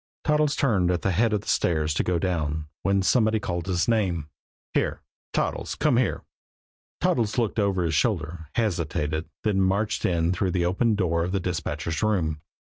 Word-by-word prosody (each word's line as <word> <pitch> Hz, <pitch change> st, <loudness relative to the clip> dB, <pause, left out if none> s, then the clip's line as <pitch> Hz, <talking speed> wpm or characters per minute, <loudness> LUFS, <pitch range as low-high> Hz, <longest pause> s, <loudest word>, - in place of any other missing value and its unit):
Toddles 150 Hz, -1 st, +2 dB
turned 100 Hz, -10 st, +2 dB
at 90 Hz, -1 st, 0 dB
the 95 Hz, -, +2 dB
head 110 Hz, +5 st, +2 dB
of 105 Hz, -2 st, 0 dB
the -, -, -17 dB
stairs 80 Hz, -3 st, +1 dB
to -, -, 0 dB
go 90 Hz, -1 st, +1 dB
down, 80 Hz, -4 st, -1 dB, 0.2 s
when 100 Hz, -1 st, +2 dB
somebody 110 Hz, +1 st, +3 dB
called 85 Hz, -3 st, -3 dB
his 90 Hz, -3 st, +1 dB
name. 90 Hz, -10 st, 0 dB, 0.4 s
"Here -, -, 0 dB, 0.3 s
Toddles! -, -, -1 dB
Come -, -, +2 dB
here!" -, -, 0 dB, 0.8 s
Toddles 110 Hz, -2 st, +1 dB
looked 115 Hz, -2 st, 0 dB
over 100 Hz, -3 st, +1 dB
his 80 Hz, -2 st, 0 dB
shoulder, 80 Hz, -3 st, -1 dB
hesitated, 80 Hz, -7 st, -1 dB
then 100 Hz, -3 st, +2 dB
marched 100 Hz, +3 st, +1 dB
in 85 Hz, 0 st, +1 dB
through 90 Hz, 0 st, -1 dB
the 90 Hz, -2 st, +1 dB
open 105 Hz, +5 st, +2 dB
door 85 Hz, -4 st, +1 dB
of 90 Hz, +2 st, -3 dB
the 100 Hz, -, +1 dB
dispatchers' 85 Hz, -3 st, -3 dB
room. 85 Hz, -8 st, 0 dB
90 Hz, 175 wpm, -25 LUFS, 85-105 Hz, 0.8 s, somebody